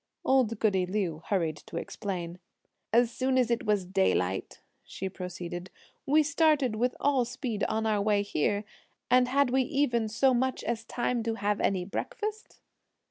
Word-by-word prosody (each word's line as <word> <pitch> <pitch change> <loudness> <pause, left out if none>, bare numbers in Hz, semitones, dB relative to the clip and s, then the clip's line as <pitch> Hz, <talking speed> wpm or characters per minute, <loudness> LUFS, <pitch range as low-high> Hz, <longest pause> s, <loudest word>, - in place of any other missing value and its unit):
Old 250 -4 +3
goody 190 -4 +2
Liu 180 -5 -2
hurried 170 -6 0
to - - -9
explain. 180 -3 -5 0.5
"As 235 +1 +4
soon 260 +1 0
as 245 -2 +2
it 235 -1 -1
was 205 -3 +2
daylight," 175 - 0 0.2
she 190 - -5
proceeded, 180 -1 -6 0.4
"we 305 +3 +5
started 305 -6 +2
with 245 +3 0
all 275 -3 +3
speed 240 -3 -4
on 220 +1 -1
our 215 -2 +1
way 205 0 +2
here, 205 +2 0 0.5
and 250 0 +5
had 275 0 +2
we 265 +1 +3
even 255 -5 +1
so 260 +5 +3
much 260 +1 0
as 230 -1 -2
time 240 0 -1
to 225 0 -2
have 205 0 -1
any 185 -2 +1
breakfast?" 425 - -5
225 Hz, 160 wpm, -29 LUFS, 195-255 Hz, 0.5 s, we